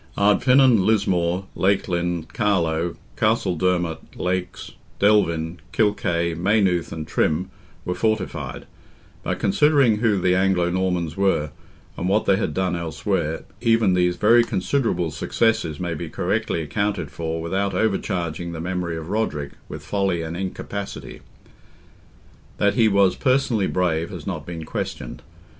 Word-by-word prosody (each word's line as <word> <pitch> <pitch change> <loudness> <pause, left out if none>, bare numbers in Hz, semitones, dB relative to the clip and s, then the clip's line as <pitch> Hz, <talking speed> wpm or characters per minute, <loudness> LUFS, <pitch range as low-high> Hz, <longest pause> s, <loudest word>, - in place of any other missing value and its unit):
Ardfinan, 125 +2 +5
Lismore, 95 -3 +1
Leighlin, 90 -3 0
Carlow, 85 -6 0 0.2
Castledermot, 90 -6 +1 0.2
Leix, 90 0 -3 0.3
Delvin, 85 -5 +2
Kilkay, 85 -6 +1
Maynooth 90 -1 +1
and 80 -2 -5
Trim, 90 +5 0 0.3
were 90 - -1
fortified; 110 +2 -2 0.6
but - - -2
considering 135 +1 +3
who 110 -2 +2
the 90 0 +2
Anglo 90 -2 +2
Normans 90 -3 -1
were, 95 -6 +1 0.5
and 90 - -1
what 105 +3 +2
they 95 - +4
had - - -1
done 95 -1 0
elsewhere, 80 0 -2 0.2
even 115 -4 +3
these 90 -1 +2
very 115 +6 +5
considerable 105 - 0
successes 80 -2 0
may 85 -2 -2
be 80 +1 -5
correctly 80 - -1
accounted 100 -1 -2
for 80 +2 -3
without 95 +4 -1
overcharging 90 -5 -1
the 80 - -6
memory 90 -1 -3
of 80 +1 -7
Roderick 80 -10 -1 0.2
with - - -8
folly 95 -4 0
and 80 +1 -5
incapacity. 95 +2 -6 1.4
That 100 -1 +2
he 115 -3 +4
was 100 -2 +3
personally 130 -6 +1
brave 85 -3 0
has - - -8
not - - -5
been 85 -2 -6
questioned. - - -5
90 Hz, 130 wpm, -23 LUFS, 85-105 Hz, 1.4 s, Ardfinan